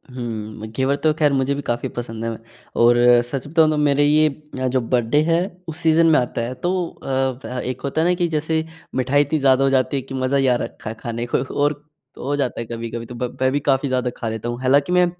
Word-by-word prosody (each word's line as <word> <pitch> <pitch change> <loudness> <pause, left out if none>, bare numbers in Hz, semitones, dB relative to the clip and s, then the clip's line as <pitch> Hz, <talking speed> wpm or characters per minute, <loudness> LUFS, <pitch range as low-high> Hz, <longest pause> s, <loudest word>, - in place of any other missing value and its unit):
हुँ, 110 -3 -5
घेवर 130 +4 +1
तो 155 -1 +4
खैर 150 -2 +3
मुझे 135 +1 +1
भी 145 - -4
काफ़ी 120 0 -1
पसंद 115 -2 -6
है। 115 - -1
मैं 110 - -6 0.4
और 120 +1 +6 0.4
सच 135 0 -4
बताऊँ 160 +1 +4
तो 155 - 0
मेरे 145 -1 +3
ये 155 +1 +4 0.3
अ, 130 - 0
जो 130 0 +1
बर्थडे 120 +4 +1
है 165 0 +4 0.3
उस 160 -1 -6
सीज़न 165 +1 +5
में 160 - +5
आता 120 -1 -2
है 120 +2 -3
तो 175 - +2 0.3
अ, 130 -1 -2
एक 130 0 -4
होता 140 +3 -1
है 165 - +2
ना 180 - +3
कि 175 -1 0
जैसे 160 0 0 0.3
मिठाई 130 +2 +3
इतनी 145 +2 0
ज़्यादा 135 -1 +4
हो 135 - +3
जाती 135 +1 +1
है - - -1
कि 135 +1 -10
मज़ा 130 +1 0
ही 135 -1 +2
आ 125 - +4
रखा - - -7
है 110 - -6
खाने 115 0 -4
को - - +2 0.2
और 145 0 0 0.3
हो 140 +3 -2
जाता 135 -3 -1
है - - -5
कभी-कभी 115 0 -5
तो 125 - -9
ब 125 0 -4
मैं 130 0 +3
भी 145 - +1
काफ़ी 140 0 +1
ज़्यादा 130 -1 0
खा 115 - -4
लेता 110 +1 -4
हूँ। 120 0 -4
हालाँकि 140 +4 +3
मैं 180 0 +5
130 Hz, 250 wpm, -21 LUFS, 120-145 Hz, 0.4 s, और